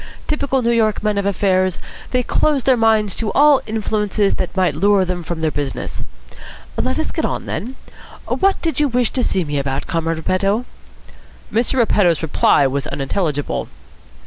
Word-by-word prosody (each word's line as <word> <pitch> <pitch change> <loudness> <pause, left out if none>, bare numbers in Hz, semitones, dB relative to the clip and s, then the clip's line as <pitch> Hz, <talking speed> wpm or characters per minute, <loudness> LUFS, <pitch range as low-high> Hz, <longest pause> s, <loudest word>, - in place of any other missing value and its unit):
Typical 270 -4 0
New 235 - +2
York 220 -3 +1
men 210 -1 +1
of 200 - -1
affairs, 185 -2 +1 0.3
they 250 -1 +1
close 285 +1 +1
their 260 +1 +4
minds 220 -3 +2
to 220 -3 -3
all 290 -1 +5
influences 210 -2 0
that 185 +1 -4
might 185 -2 +2
lure 200 -1 +3
them 180 -1 -3
from 170 0 -5
their 160 -1 +1
business. 145 -2 -4 0.7
Let - - -1
us - - -2
get - - -3
on, - - -2
then. 250 +5 -5 0.5
What 390 0 +1
did 325 -3 -1
you 295 - +3
wish 245 -2 +1
to 255 - -1
see 185 - +1
me 145 -2 -2
about, 135 0 -2
Comrade 165 0 -1
Repetto?" 195 +8 0 0.9
Mr. 230 +4 +1
Repetto's 200 - +2
reply 145 -2 +3
was 135 +1 -1
unintelligible. 145 0 -2
Mr. - - -24
200 Hz, 170 wpm, -19 LUFS, 170-235 Hz, 0.9 s, all